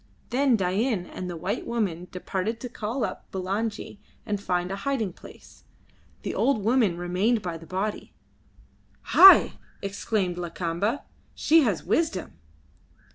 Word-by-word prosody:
Then 265 0 +3
Dain 195 +1 0
and 180 0 -7
the 175 - -5
white 180 +5 -3
woman 185 -7 -2
departed 190 +4 -3
to 250 - -5
call 230 +2 -3
up - - -8
Bulangi 200 +3 -3 0.3
and 205 -1 -2
find 180 -1 -1
a 195 - -3
hiding 220 -4 -2
place. - - -15 0.6
The - - -3
old 265 -7 +1
woman 225 -7 +2
remained 185 +6 0
by 170 -2 -4
the 165 - -13
body." 195 +3 -3 1.0
"Hai!" 385 0 +8 0.2
exclaimed 195 -2 -2
Lakamba. 175 +7 -2 0.3
"She 325 +1 +4
has 205 -8 -1
wisdom." 310 - 0
200 Hz, 130 wpm, -26 LUFS, 180-230 Hz, 1.0 s, Hai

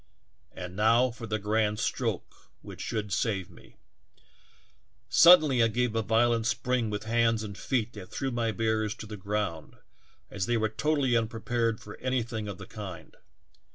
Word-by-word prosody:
And 90 0 -8
now 115 +5 +4
for 115 0 -8
the 110 - -1
grand 105 0 0
stroke - - -2 0.3
which - - -9
should 105 -3 -3
save 100 -6 -1
me! - - -18 1.3
"Suddenly 155 -8 +7
I 115 - +5
gave 120 0 -1
a 115 - +2
violent 115 +1 +2
spring 120 0 0
with 105 0 -4
hands 115 0 +1
and 100 -2 -7
feet 120 0 -2
that 95 -4 -10
threw 135 -1 -3
my 115 -2 0
bearers 110 0 -1
to - - -9
the 105 0 -7
ground, 100 -5 -3 0.6
as 95 -3 -2
they 120 - +2
were 110 -1 +1
totally 135 +1 +1
unprepared 115 0 -1
for 105 - -11
anything 120 -4 -2
of 100 -3 -6
the - - -9
kind. 100 -5 -9
110 Hz, 160 wpm, -28 LUFS, 105-120 Hz, 1.3 s, Suddenly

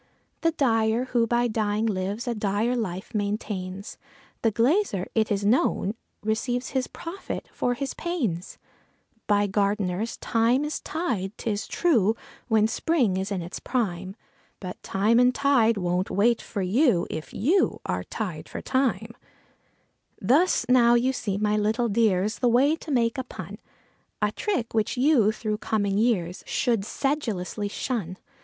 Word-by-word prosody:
The 330 - +3
dyer, 230 -4 +2
who 235 -2 +3
by 240 +1 +2
dying 215 -1 0
lives, 205 +3 -2
a 240 - +1
dire 210 +3 0
life 190 -3 -4
maintains; 200 -2 -3 0.4
The 225 - +3
glazier, 230 - +1
it 220 -1 +1
is 200 0 0
known, 210 -2 +2 0.3
receives 245 +4 -1
his 260 -1 -1
profits 345 +4 -6
for 245 - 0
his 275 +1 -3
panes. 240 - -3 0.7
By 205 0 +3
gardeners 200 +1 0
thyme 235 +5 +1
is 300 - -3
tied, 230 - -3
'tis 210 -2 -2
true, 230 - +2 0.3
when 220 -2 +3
spring 245 - +1
is 190 +2 -2
in 185 -3 -2
its 175 - -6
prime; 190 -6 -2 0.4
But 180 -2 -7
time 215 +5 +2
and 250 0 +4
tide 240 -6 +3
won't 180 0 0
wait 230 +4 +2
for 200 -3 -4
you 210 - +3
if 155 - -6
you 335 - +2
are - - -2
tied - - -5
for - - -5
time. 250 -4 0 1.1
Thus 285 - +3
now 240 -1 +5
you 255 +2 +2
see, 200 -6 -2
my 210 0 +1
little 220 +3 +1
dears, 210 -1 +1
the 245 - +3
way 270 +6 +4
to 325 - -11
make 240 -3 +1
a - - -1
pun; 250 - -9 0.6
A 210 -1 +1
trick 245 - -2
which 220 +2 0
you, 250 -6 +4
through 215 -1 -3
coming 205 -3 0
years, 190 -7 0
should 230 -6 0
sedulously 215 - -2
shun. 200 -4 -3
220 Hz, 150 wpm, -26 LUFS, 200-250 Hz, 1.1 s, now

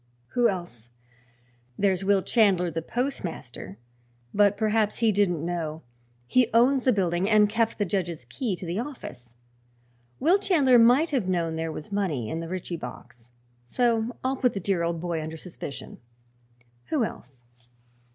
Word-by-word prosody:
Who 240 - +3
else? 175 - -6 0.9
There's 195 -2 +1
Will 195 -1 +3
Chandler, 190 -7 +3
the 165 +1 -3
postmaster; 165 - -4 0.6
but 205 0 +4
perhaps 215 -1 +1
he 225 -2 +3
didn't 180 -6 +1
know. 165 -2 -3 0.4
He 245 - +3
owns 255 +3 +4
the 255 - +5
building 185 -2 +1
and 210 -1 +5
kept 225 +2 0
the 205 - 0
judge's 175 -7 -2
key 195 - -3
to 180 - -8
the 175 +4 -2
office. 125 - -8 0.8
Will 345 +8 +4
Chandler 285 -11 +4
might 250 +8 +5
have 250 -10 0
known 170 -3 0
there 160 0 -2
was 155 +4 -8
money 165 - -1
in 160 - -2
the 165 0 -6
Ritchie 180 -1 -4
box, 120 -6 -10 0.3
so 230 - 0
I'll 265 +1 0
put 250 -2 +2
the 195 - -3
dear 190 -1 0
old 170 0 -1
boy 170 -1 -2
under 160 +1 -6
suspicion. 160 -5 -8 0.9
Who 295 -6 0
else?" 125 - -8
190 Hz, 155 wpm, -26 LUFS, 165-230 Hz, 0.9 s, the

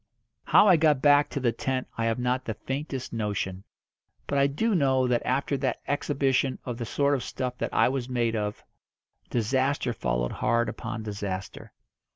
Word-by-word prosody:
How - - +6
I 180 -4 +7
got 155 -3 +3
back 145 +1 +5
to - - -3
the 125 -3 +2
tent 130 +1 -2
I 115 - -1
have 115 -1 +1
not 125 +1 -1
the 110 - -3
faintest 135 +1 -5
notion. 105 -4 -3 0.6
But 140 - 0
I 140 - +5
do 220 +11 0
know 135 -6 +3
that 125 -1 +1
after 140 +2 0
that 130 -1 -1
exhibition 135 -2 +1
of 125 -2 -4
the 120 - -4
sort 140 +4 +1
of 130 -3 -1
stuff 125 -1 -4
that - - -2
I - - +4
was 130 -1 -2
made 120 -2 0
of, 105 -1 -3 0.7
disaster 130 +2 0
followed - - -1
hard 115 -1 +1
upon 110 0 -5
disaster. 100 -3 -5
125 Hz, 180 wpm, -27 LUFS, 115-140 Hz, 0.7 s, I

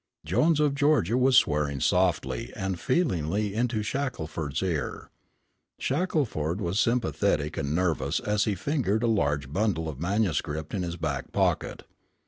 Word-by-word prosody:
Jones 160 -1 +2
of 150 -2 +3
Georgia 140 - +2
was 130 0 +4
swearing 75 - +2
softly 65 0 +1
and 95 -2 -3
feelingly 105 - 0
into 115 -1 0
Shackelford's 90 - -3
ear. 85 -6 -3 0.7
Shackelford 130 - -1
was 95 0 -1
sympathetic 100 -10 +1
and 70 +2 -2
nervous 80 -5 0
as 105 0 0
he 105 - 0
fingered 115 - 0
a - - +3
large 75 - 0
bundle 95 -5 0
of 75 -4 -6
manuscript 85 -5 -1
in 100 - -1
his 85 -1 -4
back 75 -4 -3
pocket. - - 0
95 Hz, 135 wpm, -27 LUFS, 75-120 Hz, 0.7 s, was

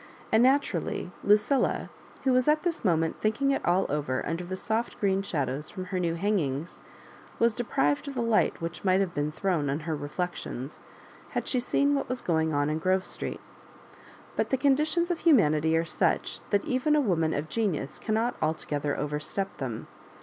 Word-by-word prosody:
And 220 - +5
naturally 250 - +1
Lucilla^ 210 +7 +2 0.3
who 265 - +3
was 255 +1 +3
at 305 0 +3
this 345 -3 -1
moment 165 -5 +1
thinking 235 +6 +1
it 275 - -1
all 180 +2 +2
over 140 -3 -1
under 165 +3 -2
the 185 +2 -5
soft 220 +4 -2
'green 195 -1 +2
shadows 150 -5 -2
from 185 -2 -6
her 185 0 -2
new 170 -2 0
hangings, 165 -6 -1 0.6
was 235 -1 +3
de 245 - -2
prived 145 - +1
of 280 - -5
the 240 - 0
light 230 -2 +2
which 165 0 -5
might 185 -1 +3
have 190 -3 0
been 145 +1 -1
thrown 160 -4 0
on 145 +4 -1
her 160 0 -2
reflections, 145 -2 -5 0.5
had - - -3
she 255 - +1
seen 280 +3 +2
what 280 - -1
was 255 0 -2
going 160 -2 +1
on 145 -1 +1
in 155 +1 -1
Grove 185 +2 +1
Street. - - -3 0.9
But - - 0
the 265 - +2
conditions 305 +6 +2
of 345 - -1
humanity 160 - +4
are 165 - +1
such 155 - 0
that 205 - +1
even 260 +4 +2
a - - +4
woman 170 - +1
of 145 +2 -2
genius 170 -9 -2
cannot 225 +2 0
altogether 150 -2 -1
over 150 +1 -2
step 195 +5 -2
them. 120 -5 -4
185 Hz, 185 wpm, -28 LUFS, 155-235 Hz, 0.9 s, And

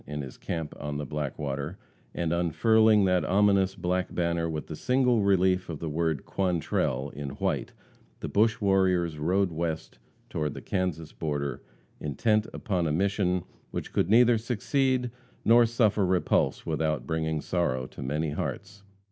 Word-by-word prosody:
in 75 0 -4
his 65 - -9
camp 80 -3 -4
on 75 0 -4
the 75 - -4
Blackwater, 75 +2 -4 0.4
and 85 -1 -1
unfurling 105 +5 +4
that 90 -1 +2
ominous 100 -1 +3
black 90 0 -1
banner 85 -1 0
with 75 -1 -4
the 80 - -7
single 125 - +2
relief 95 -2 +2
of 80 - -4
the 80 +2 -4
word 80 -2 -1
"Quantrell" 80 -7 -1
in 70 -1 -6
white, - - -1 0.5
the - - -4
bush 110 +2 +2
warriors 90 -5 +2
rode 90 +4 +1
west 80 -5 -4 0.3
toward 75 -2 -3
the - - -5
Kansas 85 -5 -2
border, 75 -3 -3 0.4
intent 105 - +1
upon 90 -7 -1
a - - 0
mission 90 +1 +1 0.3
which - - -6
could - - +1
neither 120 +1 +5
succeed 125 +2 0 0.3
nor 120 +1 +6
suffer 110 -3 +2
repulse 90 -1 +1
without 75 -5 -1
bringing 80 -1 -1
sorrow 75 -7 -1
to - - -10
many 75 +4 -1
hearts. 100 +6 -5
90 Hz, 150 wpm, -28 LUFS, 75-100 Hz, 0.5 s, nor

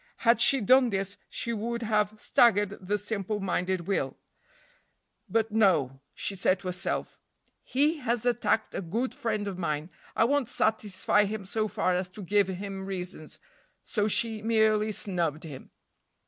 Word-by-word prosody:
Had 235 0 +5
she 270 0 +5
done 255 +4 +5
this, 195 -1 -2
she 235 - -3
would 235 +2 -3
have 215 -1 0
staggered 205 -4 +4
the 200 +3 -1
simple 205 0 -3
minded 190 -1 -1
Will; 195 +3 -2 1.1
but 225 -1 +1
no; 160 - +2
she - - -3
said 190 0 +2
to 185 0 -6
herself, 180 +1 -2 0.4
"He 295 +5 +2
has 240 -4 -1
attacked 235 -2 +1
a - - -3
good 225 +9 -2
friend 215 -3 -2
of 190 -2 -5
mine, 155 0 -2 0.2
I - - +4
won't 270 0 +1
satisfy 210 -2 +1
him 205 -1 -4
so 215 +3 -1
far 185 -3 0
as 180 +1 -1
to 205 - -8
give 200 +1 +2
him 195 +1 -5
reasons;" 180 -4 -5 0.5
so 210 -1 0
she 220 0 +1
merely 220 -1 +2
snubbed 170 -7 -2
him. 145 -5 -9
205 Hz, 155 wpm, -28 LUFS, 185-225 Hz, 1.1 s, Had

